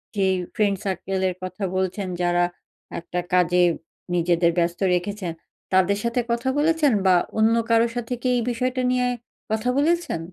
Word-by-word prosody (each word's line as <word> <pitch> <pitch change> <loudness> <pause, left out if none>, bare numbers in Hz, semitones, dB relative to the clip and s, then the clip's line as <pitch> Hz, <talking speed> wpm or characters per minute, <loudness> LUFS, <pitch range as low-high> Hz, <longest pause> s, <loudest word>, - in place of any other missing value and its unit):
যে 195 -1 +2 0.3
friend 200 -2 +2
circle 190 0 -2
এর 180 - -5
কথা 185 +2 -5
বলছেন, 190 +1 -1
যারা 175 0 +2 0.6
একটা 175 +1 -4
কাজে 180 0 +4 0.5
নিজেদের 170 0 +2
ব্যস্ত 170 0 0 0.2
রেখেছেন 185 0 -3 0.4
তাদের 190 +2 +3
সাথে 235 +1 0
কথা 235 +3 0
বলেছেন, 310 -2 +3
বা 185 -1 +6 0.2
অন্য 225 +1 +4
কারো 230 +1 +4
সাথে 240 +1 -3
কি 255 - -1
এই - - +1
বিষয়টা 255 +2 -1
নিয়ে 250 0 +1 0.4
কথা 220 +3 0
বলেছেন? 330 - +1
200 Hz, 150 wpm, -23 LUFS, 180-245 Hz, 0.6 s, বা